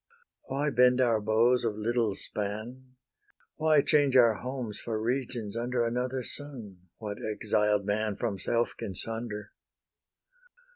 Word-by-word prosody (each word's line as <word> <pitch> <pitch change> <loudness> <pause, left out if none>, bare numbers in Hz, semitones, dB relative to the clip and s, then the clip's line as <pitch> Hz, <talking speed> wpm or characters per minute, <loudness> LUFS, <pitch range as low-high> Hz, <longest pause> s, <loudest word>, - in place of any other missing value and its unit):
Why 140 +2 -1
bend 125 0 +4
our 115 -4 +3
bows 115 +4 +3
of 110 -3 -1
little 115 -1 0
span? 115 +7 -6 0.6
Why 155 -2 +4
change 145 -3 +3
our 120 -3 +6
homes 125 -5 -4
for 110 -2 -3
regions 120 -2 -2
under 120 0 0
Another 125 +2 -2
sun? 115 -12 -5
What 105 -2 -6
exiled 105 -1 +1
man 105 0 0
From 105 -4 -3
self 120 +3 +1
can 95 - -6
sunder? 110 -1 -3
115 Hz, 130 wpm, -29 LUFS, 105-125 Hz, 0.6 s, our